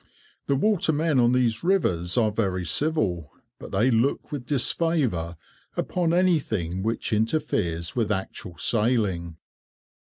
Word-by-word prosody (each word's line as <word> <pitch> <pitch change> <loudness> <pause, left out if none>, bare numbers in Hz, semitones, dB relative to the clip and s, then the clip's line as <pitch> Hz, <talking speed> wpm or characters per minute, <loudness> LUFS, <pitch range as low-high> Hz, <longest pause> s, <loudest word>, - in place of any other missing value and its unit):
The 140 - +2
watermen 160 -5 +2
on 120 0 +4
these 125 -2 +1
rivers 90 - +1
are 110 -3 +3
very 95 -4 -1
civil, 90 - 0 0.3
but - - -10
they 115 +7 +2
look 120 +4 0
with 135 -5 -5
disfavour 130 - 0 0.4
upon 175 -3 0
anything 135 - +1
which 115 +2 -2
interferes 105 - -1
with 110 -4 0
actual 95 -3 -4
sailing. 100 -5 0
115 Hz, 120 wpm, -25 LUFS, 90-145 Hz, 0.4 s, on